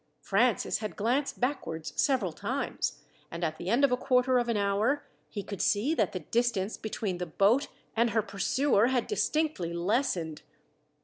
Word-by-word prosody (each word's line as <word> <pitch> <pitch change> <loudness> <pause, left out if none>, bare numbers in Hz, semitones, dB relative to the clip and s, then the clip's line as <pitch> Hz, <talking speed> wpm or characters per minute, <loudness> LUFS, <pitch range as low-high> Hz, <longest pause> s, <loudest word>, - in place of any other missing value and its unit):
Francis 230 +4 +2
had 215 -1 -5
glanced 250 +7 0
backwards 165 - -2
several 255 - +2
times, - - -3 0.3
and 170 +1 -6
at 155 -1 -1
the 175 - -4
end 240 +6 +3
of 275 - 0
a - - +4
quarter 255 -1 +3
of 240 0 -1
an 230 - +1
hour, 205 +8 +1 0.2
he 205 - -5
could 200 -2 -5
see 225 +10 +2
that - - +1
the 185 - -4
distance 225 +1 0
between 205 -4 -4
the 180 - -3
boat 215 - +3 0.3
and 235 +1 +3
her 220 -1 +1
pursuer 205 +4 +2
had 255 -1 +1
distinctly 310 - 0
lessened. 175 - -1
220 Hz, 170 wpm, -29 LUFS, 190-255 Hz, 0.3 s, a